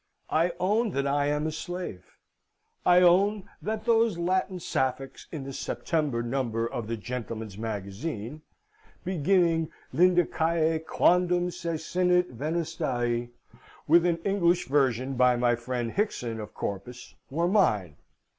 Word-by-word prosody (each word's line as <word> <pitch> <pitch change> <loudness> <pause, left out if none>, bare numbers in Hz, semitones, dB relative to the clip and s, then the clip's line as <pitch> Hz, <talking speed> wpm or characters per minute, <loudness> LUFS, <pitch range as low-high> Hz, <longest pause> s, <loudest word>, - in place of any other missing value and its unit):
I 165 +3 +2
own 215 +5 +2
that 140 0 0
I 145 +1 +1
am 150 +1 0
a 160 - -1
slave. 160 - -7 0.7
I 180 0 +6
own 195 +4 +4 0.2
that 215 0 -3
those 230 -5 +3
Latin 185 +2 0
Sapphics 130 -3 -2
in 155 -5 -5
the 135 0 -7
September 145 -5 -1
number 120 -2 -1
of 115 -1 -4
the 115 0 -3
Gentleman's 110 -2 -6
Magazine, 110 - -5 0.6
beginning 170 -2 +2 0.2
Lydicae 165 -1 +2
quondam 180 0 +3
cecinit 180 +1 0
venustae 135 -5 -2 0.6
(with 170 +2 +6
an 170 -1 +1
English 180 -3 +2
version 130 -2 +1
by 125 -1 +4
my 120 0 +2
friend 120 0 -3
Hickson 125 - -2
of 105 -1 -8
Corpus), 100 +5 -6 0.2
were 165 +5 0
mine. 105 - +2
155 Hz, 125 wpm, -27 LUFS, 120-180 Hz, 0.7 s, I